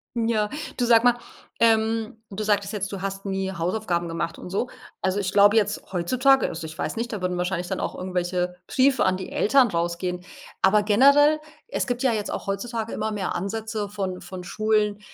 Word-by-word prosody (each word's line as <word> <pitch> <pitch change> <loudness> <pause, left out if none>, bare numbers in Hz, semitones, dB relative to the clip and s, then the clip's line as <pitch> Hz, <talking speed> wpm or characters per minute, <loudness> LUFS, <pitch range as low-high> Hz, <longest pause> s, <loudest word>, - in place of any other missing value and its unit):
Ja, 225 -2 +1 0.3
du 245 - 0
sage 230 -1 +5
mal, 245 - +6 0.5
ähm 225 0 +2
du 215 +2 -4
sagtest 205 0 0
jetzt, 200 -1 -3
du 195 -2 -5
hast 195 0 -4
nie 190 -1 -2
Hausaufgaben 175 0 -1
gemacht 165 0 -3
und - - -8
so 200 +6 -1 0.4
also, 190 +2 +1
ich 190 -1 -1
glaube 205 +2 +6
jetzt 210 -2 0
heutzutage 255 +10 +3
also, 165 -1 -6
ich 155 0 -8
weiß - - -3
nicht, 235 0 -3
da 200 - -4
würden 180 -1 -1
wahrscheinlich 180 0 -2
dann - - -3
auch - - -3
irgendwelche 180 -1 -2
Briefe 265 -3 +3
an 185 0 +2
die 185 - -7
Eltern 255 +3 +4
rausgehen. 175 +1 -2 0.4
Aber 205 +2 +5
generell 280 +8 +5 0.3
es - - -2
gibt 245 +1 -2
ja 260 - +4
jetzt 215 -3 -2
auch - - -5
heutzutage 225 +3 -3
immer 220 0 -2
mehr 205 -3 -2
Ansätze 215 +2 -3
von 195 -3 -4
von 185 -1 -8
Schulen, 210 +1 0
205 Hz, 195 wpm, -24 LUFS, 185-225 Hz, 0.5 s, mal